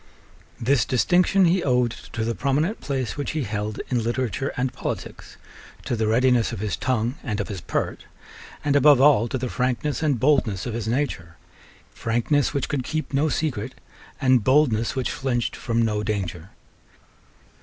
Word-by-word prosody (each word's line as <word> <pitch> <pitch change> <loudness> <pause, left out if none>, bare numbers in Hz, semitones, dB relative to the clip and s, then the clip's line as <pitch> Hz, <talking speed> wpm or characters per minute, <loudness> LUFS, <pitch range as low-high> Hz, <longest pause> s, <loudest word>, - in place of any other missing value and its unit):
This 125 +1 +2
distinction 180 +10 +3
he 175 +1 +2
owed 125 -3 +2 0.2
to 110 -1 -2
the 115 - -1
prominent 140 - 0
place 135 -3 -3
which 145 - -3
he 155 -2 -1
held 105 -1 -3
in 125 -2 +1
literature 130 +3 -1
and 130 +1 -1
politics, - - -6 0.5
to - - -1
the 110 -1 0
readiness 125 +1 +3
of - - -5
his 100 -5 -2
tongue 120 - -1
and 105 -5 -3
of 105 - -3
his 95 -5 -5
pert, - - -3 0.6
and 145 -1 +2
above 145 -1 +6
all 135 -5 +5
to 130 - -2
the 130 0 -3
frankness 130 +5 -1
and 145 -6 +1
boldness 125 -9 +2
of 120 - -4
his 115 -2 -3
nature, 110 - -2 0.6
frankness 120 +5 0
which 140 -3 -2
could 135 -3 -2
keep 155 +2 -4
no 145 +3 +2
secret, 130 -5 -2 0.4
and 130 -4 +3
boldness 130 -4 +2
which 130 -2 -1
flinched 120 -3 -2
from 115 -1 0
no 105 -2 0
danger. 95 -5 -3
125 Hz, 165 wpm, -24 LUFS, 110-140 Hz, 0.6 s, above